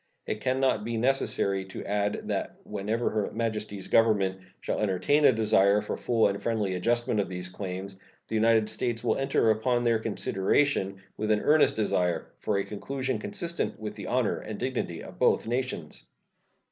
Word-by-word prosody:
It 105 - -3
can 130 0 0
not 135 -5 +2
be 115 +1 -2
necessary 110 -6 +1
to 95 - -8
add 105 0 -1
that - - -3
whenever 105 +3 -2
Her 105 -2 -1
Majesty's 110 -3 -3
Government 100 -4 +3 0.2
shall - - -2
entertain 105 +9 +2
a - - +8
desire 105 -3 +3
for 105 - -4
a - - -4
full 115 -2 +3
and 100 0 -3
friendly 110 -5 0
adjustment 120 +4 +1
of 100 - 0
these 90 -1 -5
claims 95 +1 -6 0.3
the - - -7
United 110 0 +4
States 115 0 -2
will - - +2
enter 135 -4 +2
upon 120 +3 +1
their 115 -2 +3
consideration 100 -1 0
with 110 0 -2
an 105 -1 +3
earnest 155 0 +4
desire 90 -6 0
for 105 - 0
a 100 - +1
conclusion 130 +5 -3
consistent 175 - -2
with 110 -1 -5
the - - -7
honor - - +1
and - - -7
dignity - - -3
of - - -12
both - - +3
nations. 120 -9 -3
110 Hz, 175 wpm, -28 LUFS, 100-120 Hz, 0.3 s, a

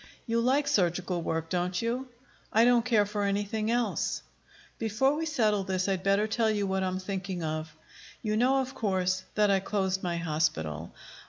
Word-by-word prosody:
"You 230 -1 +1
like 275 +4 +2
surgical 180 -7 +1
work, 165 0 -2
don't 180 0 0
you?" 245 +3 -2 0.4
"I 225 +2 +5
don't 240 -1 +5
care 225 -4 +3
for 205 0 -3
anything 205 +2 -1
else." 240 0 0 0.6
"Before 230 +6 +2
we 320 +1 -2
settle 215 -9 +2
this, 185 -1 -1
I'd 190 -2 0
better 200 +2 +2
tell 220 +1 +1
you 205 -2 0
what 190 0 0
I'm 185 0 -1
thinking 185 -2 -4
of. 155 0 -3 0.5
You 215 -1 0
know, 260 +4 +3
of 265 +1 -5
course, 185 -4 0
that 210 -1 +4
I 195 - +4
closed 190 -1 -1
my 175 -1 -2
hospital. 150 - -1
200 Hz, 175 wpm, -29 LUFS, 185-230 Hz, 0.6 s, I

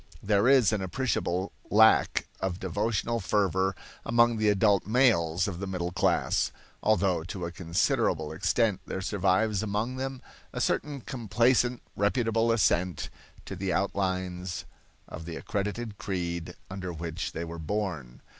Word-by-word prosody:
There 100 +2 +3
is 130 -5 +5
an 105 - 0
appreciable 95 -3 -1 0.2
lack 110 +1 +5
of 95 -1 -2
devotional 105 +5 -1
fervor 95 -2 +1 0.3
among 120 0 +3
the 110 -1 +3
adult 100 -1 +3
males 100 -9 +3
of 90 -4 -4
the 100 - -4
middle 90 -2 -3
class, - - +1 0.3
although 95 -5 +2
to 90 0 -5
a 85 - -4
considerable 85 -2 0
extent 105 +5 +1
there 95 - -4
survives 100 +1 +1
among 110 +4 -2
them 135 0 -4 0.3
a - - -3
certain 145 -2 -1
complacent, 120 0 +1
reputable 115 +2 +2
assent 90 -7 +1 0.3
to 95 - -6
the 95 0 -2
outlines 95 -2 -2 0.4
of 80 - -8
the 85 -1 -6
accredited 105 +2 -3
creed 85 -3 -3
under 95 -1 -5
which 85 +1 -4
they 85 - -3
were 85 0 -7
born. 80 - -3
100 Hz, 135 wpm, -28 LUFS, 90-110 Hz, 0.4 s, is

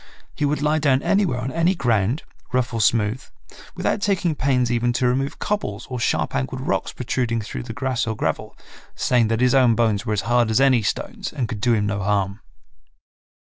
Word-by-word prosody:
He 150 - -1
would 145 0 0
lie 150 +1 +2
down 140 -2 +2
anywhere 195 -11 +2
on 130 +2 -3
any 165 +5 +2
ground, 120 - +1 0.3
rough 125 -1 0
or 115 - 0
smooth, 110 +3 +2 0.5
without 205 - -1
taking 190 -5 +1
pains 125 -4 +1
even 120 0 +1
to 125 +1 0
remove 135 +3 0
cobbles 125 - -3
or 125 - -3
sharp - - 0
angled 65 0 -2
rocks - - -1
protruding 120 -3 -1
through 100 - -6
the - - -7
grass 130 -4 -1
or 110 - -1
gravel, - - -3 0.4
saying 120 -3 +2
that 115 +1 0
his 125 -1 +4
own 125 -4 +5
bones 110 -3 +1
were 110 -3 -2
as 105 - 0
hard 120 +1 +2
as 110 - +2
any 135 -3 +4
stones 200 - -3
and 130 -6 -2
could 110 -3 -6
do 120 0 +3
him 105 -1 0
no 100 0 -2
harm. 100 0 0
125 Hz, 200 wpm, -22 LUFS, 110-135 Hz, 0.5 s, own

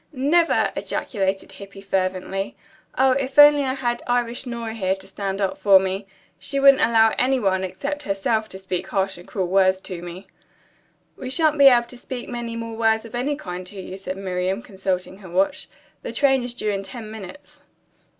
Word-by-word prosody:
"Never!" 310 +6 +2
ejaculated 195 -3 -2
Hippy 195 +1 -11
fervently. 190 0 -2 0.4
"Oh, 265 0 +4
if 265 +1 -2
I 290 - +12
only 295 0 +4
had 260 -3 -1
Irish 245 +1 -1
Nora 235 -2 -4
here 190 -4 0
to 190 0 -14
stand 195 0 -4
up 195 -2 -1
for 200 -2 +7
me! 190 +1 -3 0.3
She 275 - -2
wouldn't 275 -1 +6
allow 225 -1 +4
any 260 +1 +2
one, 190 -4 +1
except 285 +10 -4
herself, 215 -1 -1
to 190 - -7
speak 190 -2 -4
harsh 195 -2 -1
and 175 - -14
cruel 190 -3 -2
words 185 +1 +3
to 180 -3 -7
me." 175 +2 -9 0.9
"We 255 - -6
shan't 305 +1 +2
be 280 - +9
able 240 -3 +6
to 250 - -12
speak 250 0 -7
many 240 -2 -4
more 230 0 -5
words 220 0 +1
of 225 - -12
any 260 +5 -1
kind 180 -10 -6
to 200 +1 -9
you," 185 0 -7
said 190 -1 -6
Miriam, 190 +2 -2
consulting 190 -2 -3
her 190 -3 -12
watch. 190 +3 0 0.3
"The - - -5
train 270 -2 +3
is 245 0 -5
due 215 -3 -1
in 195 -1 -2
ten 215 +3 -9
minutes." 220 +6 -11
210 Hz, 190 wpm, -23 LUFS, 190-250 Hz, 0.9 s, I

